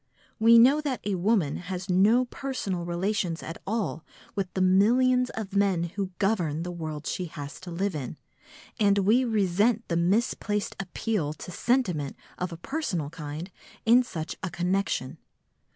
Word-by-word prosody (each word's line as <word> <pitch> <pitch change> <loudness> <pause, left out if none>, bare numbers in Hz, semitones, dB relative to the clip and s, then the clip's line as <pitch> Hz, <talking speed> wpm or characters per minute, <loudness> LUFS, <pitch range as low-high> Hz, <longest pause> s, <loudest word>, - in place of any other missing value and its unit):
We 230 +1 +7
know 265 +6 +6
that 275 -5 -2
a 205 - -1
woman 185 -5 +1
has 185 +1 -5
no 205 +7 +4
personal 225 -10 -4
relations 175 -1 -1
at 165 - -7
all 210 -6 -2 0.3
with 190 -2 -2
the 190 - +1
millions 245 +7 +4
of 210 -3 -5
men 195 -4 +2
who 200 -2 -2
govern 175 -7 0
the 180 - -4
world 155 -3 -5
she 185 - -2
has 145 -3 -8
to 185 - -9
live 190 +4 -1
in, 145 0 -5 0.6
and 205 -2 +4
we 215 +6 +4
resent 215 0 +1
the 170 - +1
misplaced 205 +2 0
appeal 190 -4 -2
to 180 - -9
sentiment 180 - 0 0.2
of 180 0 -2
a 165 - -6
personal 180 - -3
kind 160 +2 -6 0.3
in 235 +3 +7
such 165 -10 -5
a 185 - -2
connection. 175 -5 -1
190 Hz, 155 wpm, -27 LUFS, 170-220 Hz, 0.6 s, We